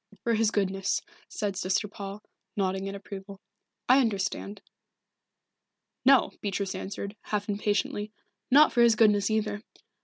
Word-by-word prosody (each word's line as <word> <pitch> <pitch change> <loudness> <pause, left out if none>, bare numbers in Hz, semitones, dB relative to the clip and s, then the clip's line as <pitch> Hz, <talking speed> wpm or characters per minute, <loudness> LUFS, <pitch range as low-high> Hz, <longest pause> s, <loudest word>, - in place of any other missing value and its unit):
"For 235 - +1
his 220 -1 +3
goodness," 195 -2 0 0.3
said 205 -3 -3
Sister 190 +3 0
Paul, 200 0 -8 0.3
nodding 190 -1 -1
in 195 - -5
approval. 195 0 -9 0.5
"I 255 +2 +6
understand." 205 -3 -1 1.4
"No," 265 -2 +5
Beatrice 200 -1 -2
answered, 200 +1 -6
half 205 -1 -3
impatiently. 205 0 -1 0.4
"Not 295 +4 +6
for 240 - +3
his 235 -1 +6
goodness 210 -2 +4
either. 210 -1 -1
205 Hz, 125 wpm, -28 LUFS, 195-220 Hz, 1.4 s, I